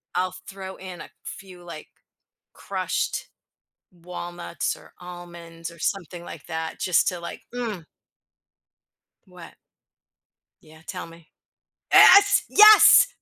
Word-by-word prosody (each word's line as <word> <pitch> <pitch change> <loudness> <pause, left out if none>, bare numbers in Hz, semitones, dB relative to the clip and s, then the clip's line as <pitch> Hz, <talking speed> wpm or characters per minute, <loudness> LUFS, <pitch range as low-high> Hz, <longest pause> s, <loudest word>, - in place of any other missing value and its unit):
I'll 185 +1 -1 0.2
throw 190 -1 -9
in 185 -2 -10
a - - -11
few, 185 -2 -11
like, 165 -3 -10 0.7
crushed - - -4 0.6
walnuts 175 0 -6
or - - -18
almonds 170 -1 -10
or 170 - -17
something 175 0 -4
like 160 - -11
that 160 -1 -5
just 180 -3 +1
to 180 - -2
like, 170 - -8
mm. 225 -8 -5 1.4
What? - - -14 1.1
Yeah, 160 +1 -18
tell 180 +3 -7
me. 165 -1 -17 0.7
Yes, 405 +1 +7
yes, 425 +3 +8
175 Hz, 110 wpm, -23 LUFS, 170-190 Hz, 1.4 s, yes